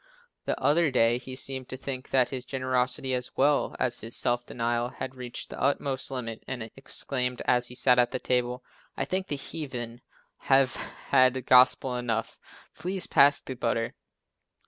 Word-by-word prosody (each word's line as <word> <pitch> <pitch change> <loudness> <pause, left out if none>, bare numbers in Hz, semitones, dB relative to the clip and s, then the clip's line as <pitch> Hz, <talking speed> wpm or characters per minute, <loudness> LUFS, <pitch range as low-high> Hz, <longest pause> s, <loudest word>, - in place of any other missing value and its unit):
The - - -1
other 160 +2 +3
day 120 -2 +3
he 130 +1 -8
seemed 130 -1 -6
to 130 - -5
think 130 0 -6
that 130 -2 +3
his 130 -2 -4
generosity, 130 0 -1
as 125 0 -3
well 145 +1 +2
as 125 -1 +1
his 115 +2 -5
self 120 0 +1
denial, 120 0 -1
had 130 +1 -6
reached 125 -2 -7
the - - -7
utmost 140 -1 0
limit 115 -4 -5
and 115 -3 -5
exclaimed 125 -2 -3
as 125 0 +2
he 125 - -9
sat 125 0 +4
at 120 - +4
the - - -2
table, 125 0 -1 0.3
"I - - 0
think 185 0 -1
the 145 - -1
heathen 125 -5 -6 0.4
have 135 -1 +3
had 130 -1 +1
gospel 130 0 +5
enough, 115 -2 -2 0.3
please 185 +1 -3
pass 140 +1 +5
the 130 - -6
butter." 115 -2 -1
130 Hz, 170 wpm, -28 LUFS, 120-135 Hz, 0.4 s, gospel